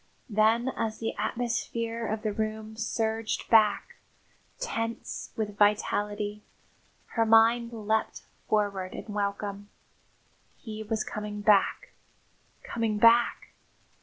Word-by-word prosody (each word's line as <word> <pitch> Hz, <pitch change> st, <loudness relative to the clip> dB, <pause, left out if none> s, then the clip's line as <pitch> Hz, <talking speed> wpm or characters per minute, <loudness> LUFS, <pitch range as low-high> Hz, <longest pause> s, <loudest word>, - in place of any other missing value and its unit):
Then, 220 Hz, +4 st, +3 dB
as 225 Hz, -4 st, -3 dB
the 225 Hz, -, -3 dB
atmosphere 230 Hz, -1 st, -2 dB
of 215 Hz, +1 st, -3 dB
the 215 Hz, -2 st, -1 dB
room 220 Hz, 0 st, -3 dB
surged 220 Hz, 0 st, -2 dB
back, 215 Hz, -3 st, +4 dB, 0.6 s
tense 230 Hz, -, -4 dB
with 210 Hz, -2 st, -3 dB
vitality, 205 Hz, 0 st, +1 dB, 0.7 s
her 230 Hz, -, +1 dB
mind 225 Hz, +1 st, +4 dB
leapt 220 Hz, -1 st, -1 dB, 0.3 s
forward 200 Hz, -3 st, 0 dB
in 210 Hz, -, -7 dB
welcome. 200 Hz, 0 st, -3 dB, 0.9 s
He 220 Hz, -2 st, -7 dB
was 220 Hz, 0 st, -2 dB
coming 210 Hz, -1 st, -5 dB
back, 210 Hz, -, +3 dB, 0.7 s
coming 225 Hz, -2 st, -1 dB
back! 230 Hz, +2 st, +4 dB
220 Hz, 105 wpm, -28 LUFS, 210-230 Hz, 0.9 s, back